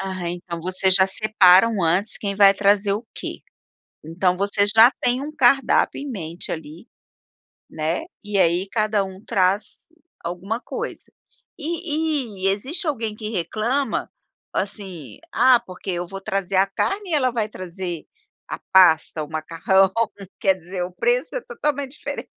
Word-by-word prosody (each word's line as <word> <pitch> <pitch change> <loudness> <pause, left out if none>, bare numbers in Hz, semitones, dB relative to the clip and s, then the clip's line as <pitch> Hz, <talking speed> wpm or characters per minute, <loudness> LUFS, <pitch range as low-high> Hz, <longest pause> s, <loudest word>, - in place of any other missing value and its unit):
Aham. 185 -2 -4
Então 170 -2 -6
vocês 185 +2 +1
já 190 0 +5
separam 200 0 +4
antes 180 +6 +1
quem 200 -1 -3
vai 200 -1 +7
trazer 200 0 +2
o 220 +3 -4
quê. - - -6 0.6
Então 180 +3 0
vocês 200 +1 +2
já 225 +3 +8
têm 245 +2 +1
um 295 +2 -5
cardápio 270 +1 +3
em 285 - -6
mente 170 -7 -5
ali, 160 +5 -8 0.8
né, 160 +2 -2 0.2
e 205 -1 -2
aí 180 +2 +2
cada 215 -2 +1
um 190 0 -10
traz 195 +1 0 0.4
alguma 180 +7 -4
coisa. - - -6 0.5
E 305 - -2
e - - +5
existe 265 - -1
alguém 230 -8 -1
que 215 -1 -6
reclama, 225 - -1 0.4
assim: 185 - -5
"Ah, 255 0 +5
porque 190 -4 -8
eu 175 -1 -3
vou 195 +2 -8
trazer 195 -1 -2
a 195 - +5
carne 390 - -2
e - - +1
ela 260 -4 +2
vai 225 -3 -1
trazer 180 -4 -6 0.4
a - - -5
pasta, 165 -4 +5
o - - -13
macarrão". 165 +5 +2 0.5
Quer 190 -1 +3
dizer, 180 0 -6
o 180 - -7
preço 485 - 0
é - - -1
totalmente 295 - -3
diferente. - - -6
195 Hz, 155 wpm, -22 LUFS, 180-235 Hz, 0.8 s, já